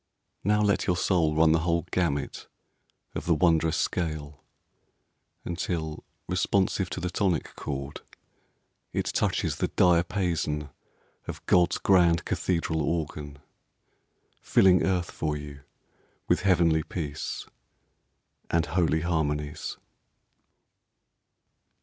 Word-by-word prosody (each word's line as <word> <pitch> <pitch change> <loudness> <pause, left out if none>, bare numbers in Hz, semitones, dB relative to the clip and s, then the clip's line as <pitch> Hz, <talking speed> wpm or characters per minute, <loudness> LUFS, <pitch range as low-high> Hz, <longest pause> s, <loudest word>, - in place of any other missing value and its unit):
Now 105 +2 +3
let 100 -1 +1
your 90 -2 +2
soul 85 -4 +2
run 80 0 +5
the 80 - +4
whole 85 0 0
gamut 75 -6 -1 0.7
of - - -5
the 85 - +4
wondrous 80 0 +3
scale 75 -4 -3 1.0
Until, 85 -3 -3 0.2
responsive 95 +1 +1
to - - -4
the 90 0 -3
tonic 90 -4 -1
chord, 70 -1 -5 0.9
It - - -1
touches - - 0
the - - 0
diapason 85 -4 +1 0.6
of - - -7
God's 90 0 +3
grand 85 -3 +3
cathedral 85 -3 -1
organ, 75 -2 -3 1.0
Filling 90 -2 +5
earth 90 -2 0
for 75 -1 -2
you 70 -1 -9 0.7
with - - +2
heavenly 85 -4 +3
peace 75 -3 -5 1.0
And 85 -1 +2
holy 80 0 +1
harmonies. 75 -3 -2
85 Hz, 100 wpm, -27 LUFS, 75-90 Hz, 1.0 s, run